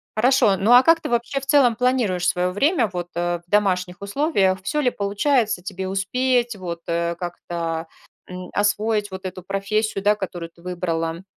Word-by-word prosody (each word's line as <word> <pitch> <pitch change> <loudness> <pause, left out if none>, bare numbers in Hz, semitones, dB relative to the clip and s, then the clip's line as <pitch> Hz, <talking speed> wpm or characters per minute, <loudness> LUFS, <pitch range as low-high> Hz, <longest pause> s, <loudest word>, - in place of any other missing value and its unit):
Хорошо, 235 -3 +4
ну, 195 +5 +1
а 245 +1 +9
как 330 +4 +4
ты, - - -5
вообще, 240 +3 -1
в - - -9
целом 270 -5 +4
планируешь 230 -7 +1
своё 180 0 +1
время, 255 - +2
вот, 175 -1 -5
э, 175 0 -1
в - - -37
домашних 185 -3 +1
условиях? 200 - +1
Всё 300 - -1
ли 270 -4 +2
получается 210 +1 0
тебе 190 0 -5
успеть, 240 +5 0
вот, 175 -3 -6
э, 170 0 -1
как-то, 170 -1 -4 0.4
м, 180 0 -8
освоить 205 0 0
вот 190 0 -8
эту 185 -1 -6
профессию, 195 +2 -1
да, 210 +1 +4
которую 175 -4 -6
ты 170 - -22
выбрала? 170 -1 -3
195 Hz, 175 wpm, -22 LUFS, 180-235 Hz, 0.4 s, а